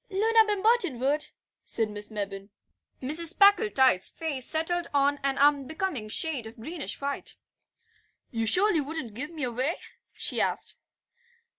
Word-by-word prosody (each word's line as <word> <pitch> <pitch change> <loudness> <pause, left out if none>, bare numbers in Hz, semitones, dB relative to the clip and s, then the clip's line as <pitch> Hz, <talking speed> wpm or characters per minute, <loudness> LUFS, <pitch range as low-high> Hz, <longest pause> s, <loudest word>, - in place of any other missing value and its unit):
"Loona 445 +3 +4
Bimberton 415 - +2
would," 285 +4 0 0.4
said 220 -2 -1
Miss 210 0 -3
Mebbin. 200 -2 -5 0.5
Mrs. 325 +6 +1
Packletide's 395 - +4
face 290 -6 -4
settled 335 +2 0
on 285 +1 +2
an 275 -1 -1
unbecoming 290 - +1
shade 270 -1 -2
of 225 +2 -13
greenish 315 +7 -6
white. 280 0 -4 1.0
"You 225 -1 -1
surely 365 - +5
wouldn't 285 -6 -5
give 275 +7 -4
me 320 -4 -6
away?" 255 +6 -1 0.4
she - - -2
asked. - - -1
290 Hz, 130 wpm, -27 LUFS, 245-340 Hz, 1.0 s, surely